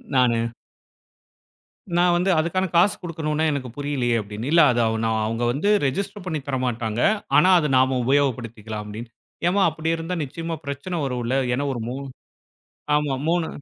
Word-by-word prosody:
நானு. 115 Hz, -2 st, +2 dB, 1.5 s
நான் 175 Hz, 0 st, +4 dB
வந்து, 180 Hz, +2 st, +1 dB
அதுக்கான 185 Hz, +4 st, 0 dB
காசு 180 Hz, +4 st, +5 dB
குடுக்கணும்னு 160 Hz, -2 st, -1 dB
எனக்கு 135 Hz, -4 st, -3 dB
புரியலையே 135 Hz, -5 st, 0 dB
அப்டினேன், 105 Hz, +5 st, -6 dB
இல்ல, 170 Hz, +1 st, +6 dB
அது 120 Hz, -, 0 dB
அ, 110 Hz, -, +2 dB, 0.4 s
அவங்க 115 Hz, +2 st, -2 dB
வந்து 150 Hz, +11 st, 0 dB, 0.2 s
ரெஜிஸ்டர் 195 Hz, +7 st, -3 dB
பண்ணி 160 Hz, -4 st, -2 dB
தரமாட்டாங்க, 120 Hz, -4 st, -1 dB, 0.4 s
ஆனா, 185 Hz, -, +6 dB
அது 150 Hz, -, -1 dB
நாம 130 Hz, 0 st, +3 dB
உபயோகப்படுத்திக்கலாம் 115 Hz, -6 st, -1 dB
அப்டின்னு. 110 Hz, +3 st, -8 dB, 0.4 s
ஏம்மா, 200 Hz, +3 st, +2 dB
அப்டி 160 Hz, +1 st, -1 dB
இருந்தா 165 Hz, +2 st, -4 dB
நிச்சயமா 165 Hz, +4 st, -5 dB
பிரச்சனை 140 Hz, +6 st, -4 dB
வரும் 125 Hz, -2 st, -2 dB
இல்ல 125 Hz, +3 st, 0 dB, 0.2 s
ஏன்னா 140 Hz, +3 st, -1 dB
ஒரு 120 Hz, -, -4 dB
3. 135 Hz, +3 st, -5 dB, 0.9 s
ஆமா, 150 Hz, -2 st, +1 dB
3 170 Hz, -1 st, +1 dB
140 Hz, 150 wpm, -23 LUFS, 120-165 Hz, 1.5 s, இல்ல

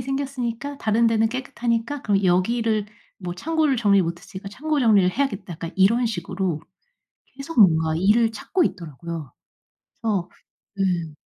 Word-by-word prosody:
생겼으니까 270 Hz, 0 st, -3 dB
다른 225 Hz, +2 st, +2 dB
데는 225 Hz, 0 st, +3 dB
깨끗하니까 245 Hz, +1 st, -2 dB
그럼 200 Hz, -2 st, +1 dB
여기를 215 Hz, +4 st, +1 dB, 0.3 s
뭐 180 Hz, -2 st, -5 dB
창고를 310 Hz, -, +1 dB
정리 205 Hz, -4 st, +4 dB
못 170 Hz, -1 st, -2 dB
했으니까 195 Hz, +1 st, -9 dB
창고 300 Hz, +7 st, -2 dB
정리를 205 Hz, -6 st, +4 dB
해야겠다.' 220 Hz, -6 st, -2 dB
약간 165 Hz, +1 st, -6 dB
이런 230 Hz, +6 st, +4 dB
식으로 185 Hz, -4 st, -2 dB, 0.8 s
계속 275 Hz, +2 st, -3 dB
뭔가 160 Hz, -5 st, +5 dB
일을 215 Hz, +6 st, +3 dB
찾고 355 Hz, -, 0 dB
있더라고요. 165 Hz, -, -5 dB, 0.7 s
그래서 205 Hz, -6 st, -1 dB, 0.5 s
네. 175 Hz, -5 st, 0 dB
215 Hz, 335 characters per minute, -23 LUFS, 180-245 Hz, 0.8 s, 뭔가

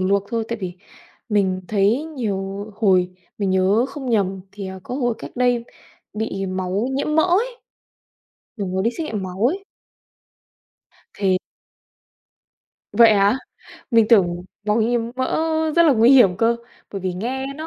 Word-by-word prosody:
luộc 195 Hz, +1 st, +1 dB
thôi, 230 Hz, -1 st, -1 dB
tại 235 Hz, -1 st, -3 dB
vì 180 Hz, -1 st, -4 dB, 0.6 s
mình 190 Hz, -3 st, +1 dB
thấy 215 Hz, +7 st, +2 dB
nhiều 200 Hz, -3 st, -3 dB
hồi 185 Hz, -4 st, +3 dB, 0.3 s
mình 200 Hz, -2 st, 0 dB
nhớ 190 Hz, +5 st, +3 dB
không 270 Hz, -4 st, -5 dB
nhầm 195 Hz, -4 st, +1 dB
thì, 200 Hz, -1 st, -7 dB
ờ, 190 Hz, 0 st, -8 dB
có 250 Hz, -, -6 dB
hồi 245 Hz, -4 st, 0 dB
cách -, -, -8 dB
đây 245 Hz, -1 st, +2 dB, 0.5 s
bị 210 Hz, -3 st, -3 dB
máu 185 Hz, +4 st, -2 dB
nhiễm 285 Hz, +2 st, -1 dB
mỡ 315 Hz, -, +6 dB
ấy, 445 Hz, +8 st, +1 dB, 1.0 s
mình 195 Hz, -3 st, -3 dB
có 190 Hz, -, +1 dB
đi 230 Hz, +4 st, +1 dB
xét 315 Hz, +6 st, -5 dB
nghiệm 215 Hz, -9 st, -4 dB
máu 185 Hz, +4 st, -2 dB
ấy. 390 Hz, +3 st, -6 dB, 1.5 s
Thì 190 Hz, -2 st, +2 dB, 1.6 s
Vậy 230 Hz, -2 st, +6 dB
hả? 200 Hz, +3 st, +3 dB, 0.5 s
Mình 230 Hz, -2 st, +5 dB
tưởng 180 Hz, -6 st, +3 dB, 0.2 s
máu 210 Hz, +2 st, +2 dB
nhiễm 235 Hz, +2 st, +1 dB, 0.2 s
mỡ 260 Hz, 0 st, -1 dB, 0.4 s
rất 340 Hz, -, +7 dB
là 315 Hz, -4 st, +5 dB
nguy 230 Hz, +1 st, +5 dB
hiểm 240 Hz, -10 st, +6 dB
cơ, 230 Hz, +3 st, +2 dB, 0.4 s
bởi 195 Hz, -, -4 dB
vì 185 Hz, 0 st, -2 dB
nghe 255 Hz, +8 st, -3 dB
nó 315 Hz, +1 st, -6 dB
210 Hz, 160 wpm, -21 LUFS, 190-245 Hz, 1.6 s, rất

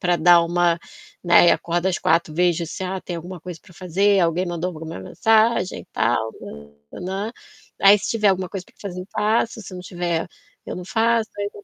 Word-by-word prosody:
pra 175 Hz, -1 st, +2 dB
dar 170 Hz, +1 st, +6 dB
uma, 170 Hz, 0 st, +1 dB, 0.5 s
né, 175 Hz, 0 st, +6 dB
e -, -, +7 dB
acordo 175 Hz, +1 st, 0 dB
às 180 Hz, -, 0 dB
4h, 165 Hz, -1 st, +1 dB
vejo 175 Hz, -1 st, +1 dB
se, 165 Hz, -, -7 dB
ah, 190 Hz, +1 st, -3 dB
tem 175 Hz, -1 st, -6 dB
alguma 175 Hz, +1 st, -8 dB
coisa 175 Hz, 0 st, -8 dB
pra 195 Hz, -, -18 dB
fazer, 195 Hz, +3 st, +2 dB
alguém 170 Hz, +2 st, +1 dB
mandou 175 Hz, +1 st, -3 dB
alguma 160 Hz, -, -7 dB
mensagem, 220 Hz, -, +1 dB
tal, 110 Hz, -1 st, 0 dB, 0.6 s
né. 195 Hz, +5 st, -4 dB, 0.5 s
Aí 200 Hz, +1 st, +8 dB
se -, -, -5 dB
tiver 215 Hz, -2 st, +2 dB
alguma 185 Hz, -2 st, -1 dB
coisa 190 Hz, -2 st, -6 dB
pra -, -, -25 dB
fazer, 180 Hz, -3 st, -6 dB
eu 185 Hz, -, -11 dB
faço, 225 Hz, +2 st, 0 dB
se 185 Hz, -, -10 dB
não 180 Hz, -, -7 dB
tiver, 175 Hz, -2 st, -3 dB, 0.4 s
eu -, -, -4 dB
não 180 Hz, -1 st, -7 dB
faço, 230 Hz, +1 st, +1 dB
aí 205 Hz, 0 st, -2 dB
180 Hz, 195 wpm, -22 LUFS, 170-200 Hz, 0.6 s, Aí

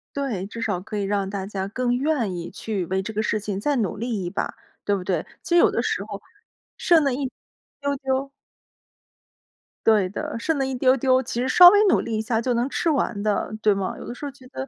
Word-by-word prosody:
对， 255 Hz, -10 st, -2 dB
至 230 Hz, +3 st, -8 dB
少 205 Hz, -5 st, -1 dB
可 205 Hz, +4 st, -8 dB
以 -, -, -1 dB
让 200 Hz, -1 st, 0 dB
大 195 Hz, -1 st, -4 dB
家 195 Hz, -2 st, -3 dB
更 245 Hz, +3 st, 0 dB
愿 260 Hz, -9 st, 0 dB
意 170 Hz, -1 st, -6 dB
去 205 Hz, -5 st, -3 dB
为 190 Hz, +3 st, -1 dB
这 220 Hz, +3 st, -5 dB
个 215 Hz, +1 st, -1 dB
事 215 Hz, -, 0 dB
情 200 Hz, -2 st, -4 dB
再 290 Hz, +7 st, 0 dB
努 210 Hz, -4 st, -1 dB
力 225 Hz, -3 st, -3 dB
一 175 Hz, -, -3 dB
把， 200 Hz, -, -3 dB, 0.3 s
对 205 Hz, -, +2 dB
不 190 Hz, -, -4 dB
对？ 180 Hz, -4 st, -1 dB, 0.2 s
其 345 Hz, -, 0 dB
实 -, -, +7 dB
有 -, -, +5 dB
的 -, -, 0 dB
时 -, -, -1 dB
候 -, -, -7 dB, 0.6 s
剩 335 Hz, -3 st, +4 dB
那 275 Hz, -, +2 dB
一 265 Hz, 0 st, -2 dB, 0.5 s
丢 280 Hz, 0 st, 0 dB
丢 270 Hz, 0 st, -2 dB, 1.5 s
对 215 Hz, -4 st, +4 dB
的， 205 Hz, -, -5 dB
剩 310 Hz, +6 st, 0 dB
那 270 Hz, -, +1 dB
一 265 Hz, -, -3 dB
丢 255 Hz, +1 st, +3 dB
丢， 260 Hz, 0 st, +3 dB
其 240 Hz, -1 st, -3 dB
实 255 Hz, -, 0 dB
稍 355 Hz, +6 st, +10 dB
微 410 Hz, +3 st, +5 dB
努 -, -, +4 dB
力 225 Hz, -1 st, -2 dB
一 -, -, 0 dB
下 225 Hz, 0 st, 0 dB
就 250 Hz, +1 st, 0 dB
能 240 Hz, +3 st, 0 dB
吃 335 Hz, -, 0 dB
完 260 Hz, -8 st, 0 dB
的， 210 Hz, 0 st, -1 dB
对 210 Hz, -1 st, +4 dB
吗？ 195 Hz, -1 st, -3 dB
有 -, -, -9 dB
的 240 Hz, -, -6 dB
时 -, -, -12 dB
候 285 Hz, -, -4 dB
觉 260 Hz, -2 st, -17 dB
得 265 Hz, +1 st, -6 dB
230 Hz, 260 characters per minute, -24 LUFS, 200-265 Hz, 1.5 s, 稍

